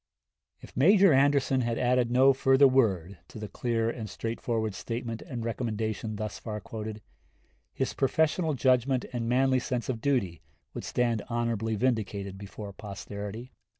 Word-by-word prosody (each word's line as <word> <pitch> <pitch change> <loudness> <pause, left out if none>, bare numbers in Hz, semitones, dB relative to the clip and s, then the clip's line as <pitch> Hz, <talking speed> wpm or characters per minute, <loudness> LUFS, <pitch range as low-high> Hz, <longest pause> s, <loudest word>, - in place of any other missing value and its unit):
If - - -13
Major 190 +5 +6
Anderson 135 -1 +3
had 115 -1 -1
added 125 -1 +2
no 130 +3 +5
further 135 +1 +5
word 100 -9 +1
to - - -11
the 105 -1 -5
clear 115 0 -1
and 115 -2 -4
straightforward 115 0 -2
statement 115 +1 -5
and 120 -8 -6
recommendation 110 -2 -3
thus 105 0 -5
far 105 -2 -5
quoted, 110 0 -7 0.7
his - - -2
professional 160 +3 +1
judgment 130 0 +2
and 115 -1 -2
manly 130 +1 +3
sense 125 -1 -3
of 115 -3 -2
duty 115 - 0 0.3
would - - -6
stand 120 -3 0
honorably 115 -2 -1
vindicated 100 -5 -1
before 100 +1 -8
posterity. 105 +3 -7
115 Hz, 145 wpm, -28 LUFS, 110-130 Hz, 0.7 s, Major